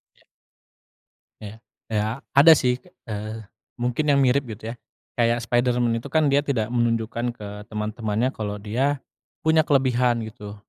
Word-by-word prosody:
Ya. -, -, -28 dB, 1.2 s
Ya, 105 Hz, 0 st, -8 dB, 0.3 s
iya 105 Hz, -1 st, 0 dB, 0.3 s
ada 145 Hz, +4 st, +9 dB
sih, 125 Hz, -4 st, +1 dB, 0.3 s
eee, 110 Hz, +1 st, -5 dB, 0.4 s
mungkin 125 Hz, +5 st, 0 dB
yang 140 Hz, -1 st, +4 dB
mirip 135 Hz, +1 st, +3 dB
gitu 110 Hz, +2 st, -7 dB
ya, -, -, -13 dB, 0.4 s
kayak 120 Hz, 0 st, +2 dB
Spiderman 120 Hz, -1 st, +1 dB
itu 120 Hz, +5 st, -7 dB
kan 155 Hz, 0 st, +3 dB
dia 140 Hz, +1 st, +3 dB
tidak 120 Hz, -6 st, -1 dB
menunjukkan 120 Hz, 0 st, 0 dB
ke 105 Hz, -3 st, -9 dB, 0.2 s
teman-temannya 110 Hz, +2 st, -1 dB
kalau 105 Hz, -1 st, -4 dB
dia 130 Hz, +7 st, 0 dB, 0.4 s
punya 160 Hz, 0 st, +4 dB
kelebihan 125 Hz, -4 st, +2 dB
gitu, 105 Hz, -2 st, -9 dB
120 Hz, 140 wpm, -24 LUFS, 110-130 Hz, 1.2 s, ada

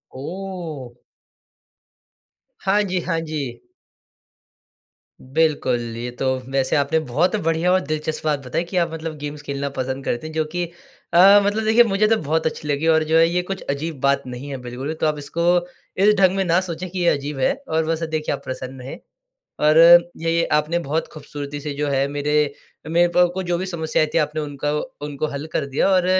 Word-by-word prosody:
ओह! 160 Hz, -5 st, -6 dB, 1.7 s
हाँ 200 Hz, +2 st, +3 dB
जी, 185 Hz, -2 st, -1 dB
हाँ 165 Hz, -1 st, -1 dB
जी। 140 Hz, -7 st, -5 dB, 1.6 s
बिल्कुल, 145 Hz, -3 st, +1 dB, 0.2 s
ये 120 Hz, +1 st, -4 dB
तो -, -, -1 dB, 0.3 s
वैसे 135 Hz, 0 st, +1 dB
आपने 145 Hz, +2 st, +2 dB
बहुत 155 Hz, -, 0 dB
बढ़िया 165 Hz, +2 st, +1 dB
और 185 Hz, -, +4 dB
दिलचस्प 155 Hz, +1 st, -3 dB
बात 150 Hz, -2 st, +1 dB
बताई 145 Hz, +7 st, -1 dB
कि 180 Hz, +2 st, -5 dB
आप 170 Hz, -1 st, +2 dB
मतलब 160 Hz, -1 st, -5 dB
गेम्स 145 Hz, 0 st, -6 dB
खेलना 140 Hz, -1 st, -3 dB
पसंद 130 Hz, +1 st, -3 dB
करते 120 Hz, +6 st, -2 dB
हैं, 160 Hz, -, -9 dB
जो 160 Hz, -, +1 dB
कि 175 Hz, +3 st, -3 dB, 0.5 s
अ, 195 Hz, +4 st, +8 dB
मतलब 210 Hz, +2 st, 0 dB
देखिए, 220 Hz, +2 st, +6 dB
मुझे 210 Hz, -1 st, +2 dB
तो 225 Hz, -, +4 dB
बहुत 160 Hz, +2 st, 0 dB
अच्छी 155 Hz, -1 st, -3 dB
लगी 145 Hz, +2 st, 0 dB
और 160 Hz, -1 st, +4 dB
जो 160 Hz, -, +4 dB
है 165 Hz, 0 st, +6 dB
ये 180 Hz, +1 st, +1 dB
कुछ 195 Hz, +1 st, -5 dB
अजीब 140 Hz, +1 st, -3 dB
बात 140 Hz, 0 st, +2 dB
नहीं 125 Hz, +3 st, -7 dB
है 135 Hz, -, -4 dB
बिल्कुल। 125 Hz, +5 st, -5 dB
तो -, -, +2 dB
आप 150 Hz, -1 st, 0 dB
इसको 145 Hz, +3 st, -5 dB, 0.6 s
इस 210 Hz, -, +6 dB
ढंग 190 Hz, -1 st, +4 dB
में 195 Hz, -, +2 dB
ना 170 Hz, +1 st, +3 dB
सोचें 180 Hz, 0 st, -5 dB
कि 185 Hz, +1 st, -5 dB
ये 175 Hz, -, +1 dB
अजीब 140 Hz, 0 st, -2 dB
है 130 Hz, -, +3 dB
और 160 Hz, 0 st, +1 dB
वैसा 165 Hz, 0 st, -1 dB
देखिए, 155 Hz, -2 st, -2 dB
आप -, -, -13 dB
प्रसन्न 130 Hz, 0 st, -6 dB
हैं। 130 Hz, +2 st, -8 dB, 0.6 s
और 155 Hz, +1 st, +5 dB, 0.4 s
ये 165 Hz, 0 st, +2 dB
आपने 150 Hz, +3 st, +2 dB
बहुत 160 Hz, -1 st, -2 dB
ख़ूबसूरती 145 Hz, -1 st, -7 dB
से 150 Hz, 0 st, -4 dB
जो 145 Hz, +1 st, -2 dB
है 135 Hz, -1 st, +1 dB
मेरे 145 Hz, +1 st, -2 dB, 0.5 s
मेरे 170 Hz, +2 st, +3 dB
को -, -, +1 dB
आपको 180 Hz, +1 st, +3 dB
जो 175 Hz, -1 st, -1 dB
भी 185 Hz, -, -3 dB
समस्या 160 Hz, -5 st, 0 dB
आई -, -, +2 dB
थी, -, -, +4 dB
आपने 155 Hz, 0 st, 0 dB
उनका 145 Hz, 0 st, -3 dB, 0.3 s
उनको 145 Hz, +1 st, -3 dB
हल 145 Hz, +3 st, -4 dB
कर 140 Hz, -, -1 dB
दिया 140 Hz, +6 st, +1 dB
और 185 Hz, -2 st, +3 dB
155 Hz, 195 wpm, -21 LUFS, 140-175 Hz, 1.7 s, अ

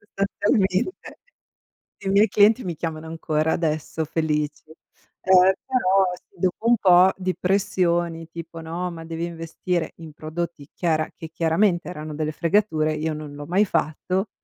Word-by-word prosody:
Sostanzialmente, 200 Hz, -, -1 dB, 0.8 s
i 195 Hz, -, -4 dB
miei 200 Hz, +3 st, +5 dB
clienti 215 Hz, +4 st, +4 dB
mi 175 Hz, -3 st, -4 dB
chiamano 160 Hz, 0 st, -5 dB
ancora 160 Hz, -1 st, 0 dB
adesso 160 Hz, 0 st, -1 dB
felic. 150 Hz, -1 st, -1 dB, 0.6 s
Ehm, 190 Hz, 0 st, +6 dB
però 195 Hz, -8 st, +2 dB, 0.2 s
dopo 185 Hz, +5 st, -1 dB
un 240 Hz, -, +5 dB
po' 185 Hz, -1 st, +6 dB
di 185 Hz, -1 st, -2 dB
pressioni 175 Hz, -3 st, 0 dB
tipo: 165 Hz, 0 st, -8 dB
"No, 170 Hz, +3 st, -4 dB
ma 165 Hz, -1 st, -9 dB
devi 165 Hz, +1 st, -4 dB
investire 170 Hz, +1 st, -3 dB
in 160 Hz, -2 st, -11 dB
prodotti 155 Hz, -1 st, -5 dB
chiara 155 Hz, -3 st, 0 dB
che 160 Hz, -, -9 dB
chiaramente 170 Hz, +3 st, +1 dB
erano 155 Hz, -3 st, -6 dB
delle 155 Hz, 0 st, -2 dB
fregature", 160 Hz, -2 st, +1 dB
io 155 Hz, +1 st, -2 dB
non 150 Hz, -1 st, -7 dB
l'ho 145 Hz, -, -7 dB
mai 185 Hz, +6 st, +3 dB
fatto 185 Hz, +3 st, -1 dB
170 Hz, 140 wpm, -23 LUFS, 160-190 Hz, 0.8 s, Ehm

